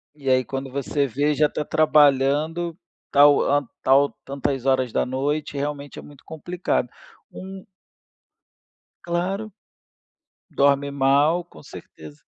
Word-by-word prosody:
E 140 -3 -5
aí, 130 -1 +3
quando 135 0 -6
você 140 +1 -1
vê, 145 +4 0
já 150 +1 +3
está 150 - -5
trabalhando, 155 +3 +2 0.3
tal 145 0 +6
hã, 145 -1 +1
tal 140 +2 +4
tantas 135 -1 -3
horas 130 -2 +1
da - - +1
noite, 140 +3 -2
realmente 145 0 -5
é - - -7
muito 145 -2 -16
complicado. 175 +3 -3 0.4
Um 190 0 -10 1.4
Claro, 190 +5 -3 1.0
dorme 140 0 +2
mal, 140 +5 +2
com 75 - -17
certeza, 75 -1 -13
145 Hz, 120 wpm, -23 LUFS, 135-155 Hz, 1.4 s, tal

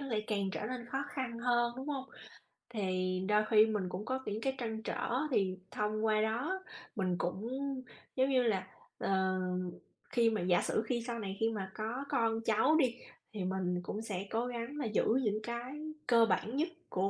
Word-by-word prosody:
nó 280 - -4
lại 220 -5 -1
càng 200 -2 0
trở - - -2
nên 250 -1 -4
khó 270 +3 -2
khăn 255 -4 -3
hơn, 240 0 +2
đúng 265 +3 -5
hông? 275 -3 -2 0.7
Thì 185 -4 0
đôi 210 0 +5
khi 215 -1 +8
mình 210 -4 -1
cũng 185 +3 -4
có 260 +2 0
những 210 +2 -2
cái 265 +2 +1
trăn 220 -3 -3
trở, - - -2 0.2
thì 190 -6 +2
thông 215 +1 0
qua 215 -1 +4
đó 255 +13 0 0.3
mình 185 -3 +1
cũng, 190 +6 -2 0.7
giống 260 +1 +3
như 260 -2 +4
là, 195 -5 +1 0.3
ờ 190 -1 +1 0.7
khi 235 -2 +4
mà 215 -4 0
giả 175 0 +4
sử 215 - +1
khi 235 0 0
sau 235 -1 -2
này 195 -2 -4
khi 225 - +3
mà 195 -4 -3
có 225 +5 -2
con 225 -1 +2
cháu 225 +7 +4
đi, 255 -5 +3 0.4
thì 205 -3 -2
mình 180 -1 0
cũng 210 - -3
sẽ 195 -4 -3
cố 230 +2 0
gắng 245 +3 -4
là 285 - -1
giữ 215 -2 +2 0.2
những 215 -2 +1
cái 235 +3 -4 0.3
cơ 230 -2 +7
bản 225 +1 0
nhất 320 +4 +2 0.2
của 190 +1 +1
220 Hz, 200 wpm, -34 LUFS, 195-245 Hz, 0.7 s, khi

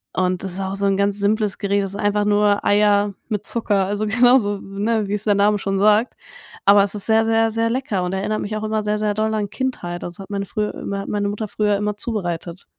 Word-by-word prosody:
Und, 185 0 0
das 190 -2 -4
ist 185 - -4
auch 190 0 -3
so 200 0 -1
'n 195 0 +1
ganz 200 0 +1
simples 210 0 0
Gericht. 200 -1 0
Das 195 - -4
ist 200 - -6
einfach 205 0 +1
nur 205 0 +2
Eier 205 0 +3 0.2
mit 210 -1 -3
Zucker, 205 -4 0
also 205 +2 -2
genauso, 225 -2 +3
ne, 205 +2 -2
wie's 205 +1 -2
der 205 -2 +2
Name 205 +1 +3
schon 195 0 -1
sagt. 215 +4 +3 0.5
Aber 200 0 +7
es 200 - -3
ist 205 - -4
sehr, 225 0 +4
sehr, 225 0 +2
sehr 230 +1 0
lecker 235 -7 -1
und 180 +1 -3
erinnert 205 +3 -2
mich 215 +1 -4
auch 215 - -4
immer 215 0 -1
sehr, 210 0 -1
sehr 210 -1 0
doll 220 +1 0
an 210 -2 -1
Kindheit. 195 -11 -4
Also, 175 - -6
es - - -27
hat 195 - -9
meine 200 0 -2
früher 210 +2 -3 0.2
hat 195 - -5
meine 205 -1 -1
Mutter 210 +1 -4
früher 210 0 0
immer 210 0 -2
zubereitet. 175 -5 -4
205 Hz, 245 wpm, -21 LUFS, 195-215 Hz, 0.5 s, Aber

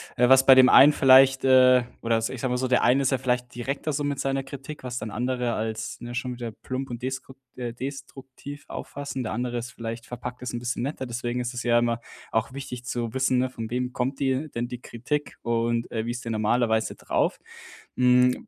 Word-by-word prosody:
äh, 125 -1 +4
was 130 0 +7
bei 135 - +8
dem 130 0 +7
einen 145 - +8
vielleicht, 135 -1 +6
äh 130 -1 +6 0.2
oder 115 -1 +1
es 115 0 -1
ich 130 - -7
sage 130 - -1
mal 125 - 0
so, 130 +1 -1
der 125 -1 +3
eine 135 +3 +3
ist 135 - +1
ja 135 - +1
vielleicht 125 -1 -1
direkter 140 +5 -3
so 145 +1 -1
mit 145 -1 -2
seiner 135 0 0
Kritik, 140 +2 -9
was 125 -1 -5
dann 110 -2 -5
andere 125 +1 -1
als, 110 0 -4
ne, 120 0 -7
schon 125 +1 -3
wieder 120 -2 -6
plump 130 +5 -6
und 120 0 -7
deskrukt 130 0 -5 0.2
äh, 120 -2 -4
destruktiv 135 +2 -8
auffassen, 140 -2 -6
der 115 - -3
andere 120 +1 -2
ist 120 - -6
vielleicht 115 -1 -7
verpackt 125 0 -7
es 125 - -4
'n 120 - -4
bisschen 120 0 -3
netter. 135 0 -3
Deswegen 120 0 -3
ist 125 +1 -4
es 125 - -4
ja 120 -1 +3
immer 120 -1 +1 0.3
auch 115 +4 -1
wichtig 130 -3 -7
zu 120 -2 -3
wissen, 130 -1 +1
ne, 130 0 0
von 115 -3 -6
wem 125 +1 -2
kommt 130 +2 -2
die 135 +3 0
denn 120 -1 -3
die 125 0 -8
Kritik 145 +6 -4
und, 115 0 -1
äh, 110 0 -3
wie - - -1
ist 120 0 -6
der 115 - -3
normalerweise 110 +1 +1
drauf? - - -1 0.6
Hm, 125 0 +3
125 Hz, 225 wpm, -25 LUFS, 120-130 Hz, 0.6 s, bei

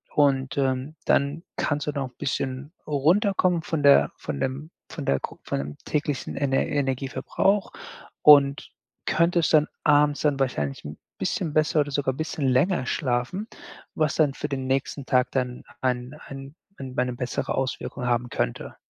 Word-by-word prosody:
und, 135 -1 +2
ähm, 135 +2 0
dann 145 +4 +1
kannst 145 0 -1
du - - +1
noch 140 -2 -2
'n 125 - -32
bisschen 135 +2 -3 0.2
runterkommen 175 +4 +2
von 160 -3 -2
der 140 0 +6
von 70 - -5
dem 135 +5 -3 0.2
von 150 - -6
der 70 - +2
gro - - -7
von - - -2
dem 70 +1 -6
täglichen 145 -3 -2
Ener 135 -1 +1
Energieverbrauch 140 +8 0 0.5
und 140 -1 +6 0.3
könntest 170 -2 +2
dann 155 -1 +5 0.2
abends 145 -1 +4
dann 145 -2 +1
wahrscheinlich 75 - -2
'n 75 +1 -7 0.2
bisschen 160 -4 -1
besser 155 0 +3
oder 145 - -3
sogar 135 -1 0
bisschen 155 -1 -2
länger 130 +4 +2
schlafen, 130 - -1 0.5
was 155 -3 +1
dann 150 -4 +3
für 150 - -4
den 135 -2 -3
nächsten 135 +1 -1
Tag 125 0 +2
dann 125 -2 -2 0.2
an 125 +1 -1
an 135 +1 -9 0.2
an 130 -2 -7
eine 125 0 +1
bessere 125 +1 -3
Auswirkung 130 -1 -3
haben 120 0 0
könnte. - - -3
140 Hz, 160 wpm, -25 LUFS, 130-150 Hz, 0.5 s, der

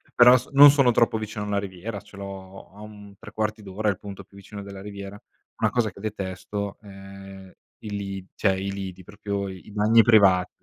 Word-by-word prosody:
però 125 +1 +8
s 125 - -7
non 145 +1 +9
sono 140 -3 +3
troppo 115 -1 +2
vicino 110 -1 -5
alla 100 -1 -1
riviera, 100 +2 -6
ce 105 -1 -16
l'ho 95 -2 -10
a 105 - -13
un 105 -1 -12
3/4 110 0 -4
d'ora 105 +2 -2
il 95 - -2
punto 100 -2 -9
più - - -23
vicino 100 +1 -10
della 100 -1 -10
riviera. 100 0 -9 0.4
Una - - +1
cosa 115 -4 0
che 95 - -15
detesto 100 0 -5
è 95 -1 -12 0.3
i 105 - -6
li 100 -2 -5
cioè 95 - +2
i 95 +1 -3
lidi, 95 -2 -7
proprio 100 +1 -5
i 95 +2 -11
bagni 110 +2 +4
privati. 100 -5 +5
100 Hz, 190 wpm, -24 LUFS, 95-105 Hz, 0.4 s, non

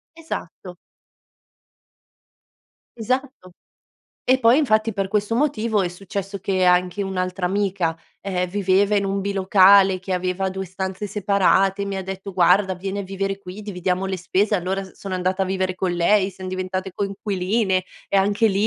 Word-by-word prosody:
Esatto. 185 - -7 2.2
Esatto. 255 -3 -3 0.7
E 255 +1 +4
poi, 235 +2 +5
infatti 220 -6 +2
per 195 -2 -1
questo 210 +2 0
motivo, 230 -6 +1
è 180 - 0
successo 195 +2 -6
che 190 0 0
anche 180 +2 +2
un'altra 185 -1 -3
amica, 190 -4 0 0.3
ehm, 180 -2 -2
viveva 200 +1 +2
in 200 - +1
un 195 0 -1
bilocale 195 -1 +5
che 185 +1 -5
aveva 185 +1 -1
2 190 0 -4
stanze 190 +2 -4
separate, 200 0 +2
e - - -1
mi 195 -1 -3
ha 190 - -3
detto: 190 +1 -7
"guarda, 185 +2 +3
vieni 195 +2 -5
a - - -3
vivere 195 +1 -3
qui, 195 +1 -9
dividiamo 185 -2 -2
le 190 -1 -2
spese", 195 +4 0
allora 190 +1 -1
s 190 - -12
sono 195 -2 -6
andata 185 +1 0
a - - +2
vivere 185 -1 -1
con 185 -1 -1
lei, 190 +3 +2
siam 185 0 -8
diventate 185 0 -4
coinquiline 195 -1 -1 0.2
e 200 - +1
anche 205 +3 +3
lì, 200 +2 +1
195 Hz, 160 wpm, -22 LUFS, 185-200 Hz, 2.2 s, poi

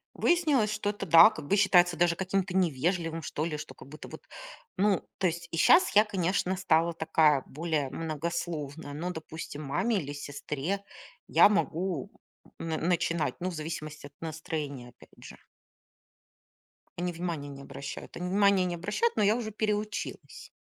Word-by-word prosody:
Выяснилось, 300 -11 +2
что 205 -1 -1
это 205 -1 -6
да, 165 +3 +9
как 145 - -9
бы 200 - +3
считается 180 -4 +4
даже 175 -1 +3
каким-то 190 0 -1
невежливым, 165 0 0
что 150 +2 -3
ли, 155 -2 -3
что, 140 - -8
как 130 - -14
будто 150 +3 -10
вот, - - -10 0.6
ну, 200 -2 +1
то 190 - -1
есть 170 0 -4
и 165 - -3
щас 350 - +5
я, 210 - +8
конечно, 185 -1 0
стала 170 -2 +2
такая, 155 -3 +3
более 155 -2 -2
многословная, 155 -1 -4
но, 165 +5 -4
допустим, 160 -2 -7
маме 210 +11 0
или 145 -4 -6
сестре 145 +6 -4 0.4
я - - +6
могу, 180 -6 -1 0.5
м, - - -5
на 160 - -1
начинать, 170 -1 0
ну, 185 - -2
в 180 - -6
зависимости 155 -1 -6
от 145 - -12
настроения 150 -5 -5
опять 120 - -19
же. - - -11 1.6
Они 175 0 -1
внимания 165 -4 -4
не 140 -1 -9
обращают, 140 0 -8
они 180 +1 -4
внимания 200 -1 +4
не 175 -1 -2
обращают, 205 - -1
но 215 - +2
я 205 +2 +4
уже 230 -2 -4
переучилась. 210 - -4
170 Hz, 165 wpm, -29 LUFS, 155-195 Hz, 1.6 s, да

